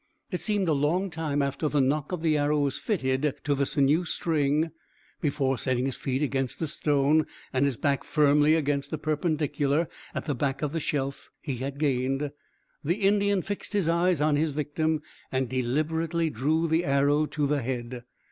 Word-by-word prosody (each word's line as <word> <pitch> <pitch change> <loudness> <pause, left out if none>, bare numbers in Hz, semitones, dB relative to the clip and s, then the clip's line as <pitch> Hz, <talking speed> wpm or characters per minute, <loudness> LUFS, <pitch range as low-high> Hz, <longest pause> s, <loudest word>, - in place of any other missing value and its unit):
It 180 - -2
seemed 205 -4 +1
a 160 - +3
long 165 +7 +1
time 150 -3 -1
after 140 +2 -1
the 145 - +1
nock 140 +3 +1
of 175 -3 -3
the 155 -2 +3
arrow 150 0 +2
was 140 -2 0
fitted 140 - 0
to 145 - +1
the 140 -1 0
sinew 145 +5 +3
string 155 -2 0 0.5
before, 135 -4 0
setting 130 -1 0
his 135 - -2
feet 135 +2 -2
against 135 -3 -1
a 165 - 0
stone 150 +1 +2 0.3
and 130 +2 +3
his 135 -4 0
back 140 -2 0
firmly 150 0 +4
against 145 -3 0
the 155 - -3
perpendicular 155 0 0 0.3
at - - -3
the 150 - 0
back 135 +2 -2
of 145 - 0
the 165 - -1
shelf 140 -3 -3
he 135 -6 -4
had 135 +2 -4
gained, 135 0 0 0.5
the 165 +4 +1
Indian 200 -1 +2
fixed 205 +1 -5
his 200 -5 +1
eyes 170 -1 +2
on 150 -1 +3
his 160 +2 +1
victim 155 +2 -1 0.3
and 130 -1 0
deliberately 155 +6 0
drew 155 +7 +1
the 160 +2 +2
arrow 145 +1 +2
to 150 -1 -1
the 145 0 +1
head. 120 0 -4
150 Hz, 185 wpm, -27 LUFS, 140-160 Hz, 0.5 s, firmly